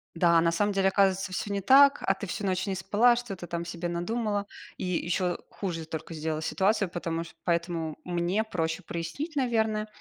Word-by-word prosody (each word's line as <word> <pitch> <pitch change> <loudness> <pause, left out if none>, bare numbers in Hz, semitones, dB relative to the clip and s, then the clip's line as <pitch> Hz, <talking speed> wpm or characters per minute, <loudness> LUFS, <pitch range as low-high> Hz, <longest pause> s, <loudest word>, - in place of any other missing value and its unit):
Да, 170 -1 +4
на 170 0 +3
самом 205 +4 +1
деле, 195 0 +2
оказывается, 195 0 +2
всё 205 +2 -3
не 200 - -1
так, 275 +6 +7
а 195 - +2
ты 195 - -6
всю 200 +3 -4
ночь 185 0 0
не 195 - -1
спала, 210 +7 +4
что-то 205 -7 -5
там 170 0 -3
себе 170 0 -4
надумала. 205 +3 -1 0.3
И - - -5
ещё 180 0 0
хуже 165 -5 -4
только 160 +1 -6
сделала 155 0 -2
ситуацию, 195 +3 +1
потому 165 -1 -3
ш 165 - -12
поэтому 170 -2 -1
мне 175 +4 0
проще 165 -6 -2
прояснить, 175 - -5
наверно. 220 -5 +1
185 Hz, 185 wpm, -28 LUFS, 170-205 Hz, 0.3 s, так